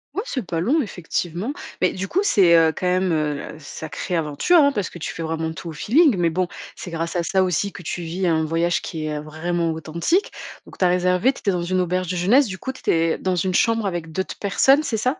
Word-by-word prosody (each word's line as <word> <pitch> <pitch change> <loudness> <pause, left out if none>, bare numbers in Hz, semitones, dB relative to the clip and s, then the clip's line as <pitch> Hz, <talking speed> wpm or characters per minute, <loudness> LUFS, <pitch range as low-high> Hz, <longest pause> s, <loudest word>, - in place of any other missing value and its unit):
Ouais, 405 - -1
c’est 255 - -4
pas 165 -2 -2
long 285 - +2
effectivement. 180 - -3 0.3
Mais - - +3
du 190 +1 -4
coup, 380 - +1
c'est, 185 - +5
heu, 160 -1 +5
quand 180 - -2
même, 185 0 +1
heu, 150 -1 -2
sacrée 160 +4 -5
aventure, 160 - +2
hein, 285 -1 +5
parce 205 -8 -2
que - - -11
tu 155 - -5
fais 165 - -7
vraiment 160 0 -2
tout 165 - -7
au - - -5
feeling. 255 - +3
Mais 170 -2 +2
bon, 180 +1 0 0.3
c'est - - -8
grâce 165 +1 -3
à 175 - +2
ça 190 +2 +1
aussi 185 +2 0
que 180 - -10
tu 175 - -4
vis 170 +3 -3
un 160 -2 +2
voyage 170 +2 0
qui 160 -3 -5
est 150 -1 -3
vraiment 165 +2 -2
authentique. 170 - -1 0.3
Donc, - - -15
tu 185 - +3
as - - +6
réservé, 180 +7 +2
tu - - -12
étais 200 - +1
dans 175 -1 -1
une 185 +2 0
auberge 180 0 0
de 180 - -2
jeunesse, 235 +9 +4
du 190 -1 -6
coup 260 - -4
tu - - -13
étais 165 -1 +1
dans 185 -1 0
une 185 +2 0
chambre 225 +2 +2
avec 170 -4 -3
d'autres 190 +3 -4
personnes, 270 +8 +4
c'est 235 -7 -2
ça? 255 +7 -1
180 Hz, 250 wpm, -22 LUFS, 165-200 Hz, 0.3 s, as